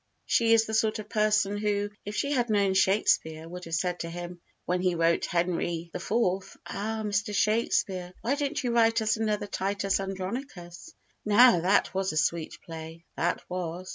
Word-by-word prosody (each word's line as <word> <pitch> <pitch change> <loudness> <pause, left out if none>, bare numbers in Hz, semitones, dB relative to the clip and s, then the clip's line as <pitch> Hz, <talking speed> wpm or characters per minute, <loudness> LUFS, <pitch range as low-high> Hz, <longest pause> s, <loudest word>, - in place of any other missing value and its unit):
She 230 -1 +3
is 225 0 +3
the 220 - -6
sort 220 0 +2
of 215 -1 -8
person 210 -1 +2
who 205 -1 -1
if 205 +1 -5
she 280 - -1
had 245 -4 +1
known 200 -2 +2
Shakespeare 175 -5 +2
would 180 +1 -8
have 165 0 -2
said 180 +1 -1
to 170 - -4
him, 175 +1 -7 0.2
when 180 +1 0
he 180 -1 +1
wrote 165 0 +2
Henry 170 -1 -1
the - - -4
IVth: 190 -1 -1
"Ah, 220 +2 -3
Mr. 205 +1 -1
Shakespeare, 195 -4 +1
why 245 - 0
don't 285 -2 -2
you 245 - 0
write 230 -1 +3
us 215 +1 +1
another 215 -2 -1
Titus 195 0 -1
Andronicus? 195 - -6 0.3
Now 220 -1 +6
that 190 +4 +2
was 190 -2 -1
a - - -3
sweet 160 +1 0
play, 165 0 -9
that 175 - -1
was." 180 0 -5
195 Hz, 180 wpm, -28 LUFS, 175-215 Hz, 0.3 s, Now